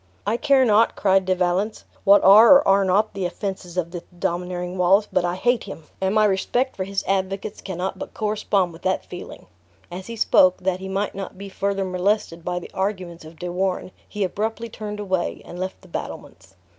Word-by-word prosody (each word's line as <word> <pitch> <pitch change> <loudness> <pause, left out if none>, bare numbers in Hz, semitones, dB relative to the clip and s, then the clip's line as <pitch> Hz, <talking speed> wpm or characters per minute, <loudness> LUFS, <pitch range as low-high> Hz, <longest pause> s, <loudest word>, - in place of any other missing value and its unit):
"I 220 - +1
care 270 +1 +3
not," 220 0 +4
cried 195 -1 +2
De 185 0 +1
Valence, 185 +4 -1 0.2
"what 200 +1 +6
are 215 +7 +9
or 280 - +4
are 195 0 +5
not 195 +3 +2
the 195 -3 -2
offenses 185 -1 -6
of 170 -2 -1
this 175 -1 -6 0.2
domineering 180 +1 -3
Wallace, 195 +4 +4
but 180 - +2
I 175 0 -1
hate 240 +4 +1
him; 190 -5 -9 0.2
and 190 +2 0
my 215 0 +5
respect 240 +6 0
for 185 - -3
his 195 0 -3
advocates 195 +1 -2
cannot 190 0 -4
but - - -8
correspond 205 -4 0
with 165 - -13
that 190 0 -1
feeling." 180 - -10 0.5
As 185 +2 -7
he 230 - -6
spoke, 185 -4 +4
that 185 0 -1
he 190 0 -7
might 195 +2 -2
not 195 -1 -7
be 200 +1 -8
further 195 0 -1
molested 185 -2 -1
by 180 0 -2
the 180 - -7
arguments 185 -4 -3
of 160 +1 -13
De 180 +1 -5
Warenne, 185 0 -2 0.2
he 210 -1 -2
abruptly 220 +5 -3
turned 210 -1 -7
away, 190 -4 -2
and 175 - -9
left 185 +1 -4
the - - -15
battlements. 130 - -8
190 Hz, 205 wpm, -23 LUFS, 180-205 Hz, 0.5 s, are